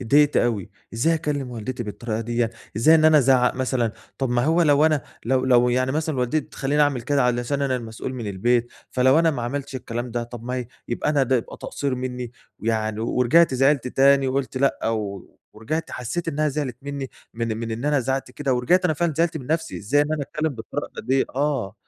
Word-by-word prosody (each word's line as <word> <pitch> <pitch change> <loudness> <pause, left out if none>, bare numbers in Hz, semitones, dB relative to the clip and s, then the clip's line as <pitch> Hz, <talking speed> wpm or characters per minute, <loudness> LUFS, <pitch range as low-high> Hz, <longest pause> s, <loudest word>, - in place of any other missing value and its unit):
أتضايقت 145 +5 +4
أوي، 110 -6 +1 0.2
إزاي 160 +9 +2
أكلِّم 150 -5 -2
والدتي 120 +1 -5
بالطريقة 110 +1 -4
ديّة؟ 120 0 -1 0.3
إزاي 140 +9 +6
إن 155 -1 +4
أنا 155 -1 +7
أزعق 130 -2 +4
مثلًا؟ 125 -3 0 0.3
طب 135 -3 -1
ما 120 0 +2
هو 165 +3 +3
لو 150 0 +5
أنا 155 -4 +1 0.2
لو 130 +1 +1
لو 125 -1 +4
يعني 130 +2 +1
مثلاً 155 -2 -1
والدتي 125 +5 +1
تخلِّيني 145 +2 0
اعمل 140 -4 +1
كده 140 +2 +1
علشان 125 +3 0
أنا 130 -2 +1
المسؤول 115 +2 -6
من 120 -4 -5
البيت، 120 +5 0 0.2
فلو 130 +4 +4
أنا 165 -1 +4
ما 125 -5 -4
عملتش 135 +2 -4
الكلام 120 -1 -5
ده، 120 0 -2
طب 120 -1 -9
ما 125 +1 -3
هي 125 -2 -3 0.2
يبقى 120 +5 -1
أنا 145 -3 +2
ده 130 0 +2
يبقى 115 - -5
تقصير 140 -2 -3
مِنِّي، 125 -1 -4 0.3
يعني 110 -1 -1
ورجعت 125 +6 +3
زعلت 135 0 +2
تاني، 135 +1 +4
وقُلت 130 0 -2
لأ، 135 -3 +1
و 105 -4 -4 0.2
ورجعت 135 +10 -4
حسّيت 165 +8 -4
إنها 155 0 +1
زعلت 135 -4 -3
مِنِّي، 140 -2 -5 0.2
من-من 115 0 -3
إن 115 +4 -4
أنا 145 -2 +2
زعقت 135 +2 -2
كده، 135 -3 -1
ورجعت 175 +10 +2
أنا 155 - +2
فعلاً 170 0 0
زعلت 165 -1 +1
من 130 -4 -7
نفسي. 160 +1 -1
إزاي 140 +8 +2
إن 150 +1 -2
أنا 150 -2 -1
أتكلِّم 155 +3 -2
بالطريقة 110 -1 -6
ديّه؟ 130 +1 +2
آه، 135 -8 -1
130 Hz, 205 wpm, -23 LUFS, 120-145 Hz, 0.3 s, أنا